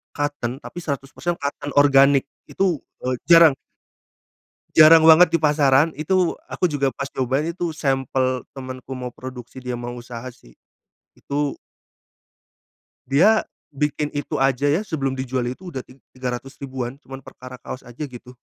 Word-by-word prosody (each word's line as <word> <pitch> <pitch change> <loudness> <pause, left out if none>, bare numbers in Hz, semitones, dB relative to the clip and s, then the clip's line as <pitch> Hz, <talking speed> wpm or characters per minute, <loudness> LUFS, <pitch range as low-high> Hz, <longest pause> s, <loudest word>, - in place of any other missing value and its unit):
cotton 145 -4 -3
tapi - - -8
100% 150 +2 -4
cotton 145 0 -4
organik, 140 -1 +5 0.3
itu, 185 -6 0 0.2
eee, 130 0 0
jarang. 165 -4 +8 1.2
Jarang 160 +1 +8
banget 160 +2 +7
di 165 - +3
pasaran. 150 -1 +4
Itu 180 +3 +1
aku 180 - -1
juga 140 -3 0
pas 140 0 -5
nyobain 135 +5 0
itu 170 -1 -3
sampel 135 -2 -1
temenku 130 -1 -8
mau 125 -1 -6
produksi, 125 0 -10
dia 125 -1 -4
mau 120 0 -6
usaha 120 -1 -8
sih, 60 - -21 0.6
itu 145 0 -2 1.6
dia 195 +11 +4 0.3
bikin 150 +1 -2
itu 145 - -3
aja 135 +1 +2
ya, 150 +7 +2
sebelum 135 -7 -2
dijual 130 -1 -2
itu 175 +9 -7
udah 135 - -4
ti 125 - -17 0.2
tiga 125 -1 -3
ratus 135 +3 -15
ribuan, 130 -1 -5
cuma 135 -3 -9
perkara 125 0 -11
kaos 125 +2 -8
aja, 120 +5 -8
gitu. 125 -1 -12
135 Hz, 145 wpm, -22 LUFS, 130-150 Hz, 1.6 s, jarang